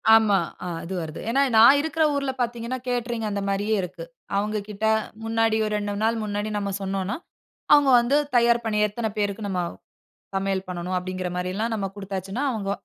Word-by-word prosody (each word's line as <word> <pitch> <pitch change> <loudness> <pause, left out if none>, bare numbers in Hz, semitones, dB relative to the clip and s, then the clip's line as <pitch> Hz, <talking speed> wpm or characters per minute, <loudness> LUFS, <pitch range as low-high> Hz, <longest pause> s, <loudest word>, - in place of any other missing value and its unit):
ஆமா. 210 -3 +5 0.4
அது 185 +3 -6
வருது. 155 -1 -6
ஏனா, 270 +4 +3 0.2
நான் 235 +6 +8
இருக்கிற 320 0 0
ஊர்ல 275 -1 0
பார்த்தீங்கனா, 240 +1 -2
கேட்டரிங் 240 -2 -1
அந்த 200 -1 -2
மாரியே 205 +2 +1
இருக்கு. 180 - -6 0.3
அவங்ககிட்ட 210 0 -2 0.4
முன்னாடி 225 0 +2
ஒரு 215 - -2
2 205 0 -3
நாள் 225 +1 +2
முன்னாடி 205 +1 -2
நம்ம 200 -1 -2
சொன்னோம்னா, 195 0 -2 0.6
அவங்க 290 -2 +6
வந்து 240 +4 +1 0.2
தயார் 235 0 +4
பண்ணி 210 -1 0
எத்தன 220 +1 -3
பேருக்கு 205 0 -1
நம்ம 185 -2 -1 0.7
சமையல் 195 0 -1
பண்ணனும் 180 +1 -3
அப்படிங்கிற 185 0 -3
மாரியெல்லாம் 190 +6 -2
நம்ம 195 -2 -2
குடுத்தாச்சுன்னா, 195 +5 -4
அவங்க 200 -4 -2
210 Hz, 160 wpm, -24 LUFS, 195-230 Hz, 0.7 s, நான்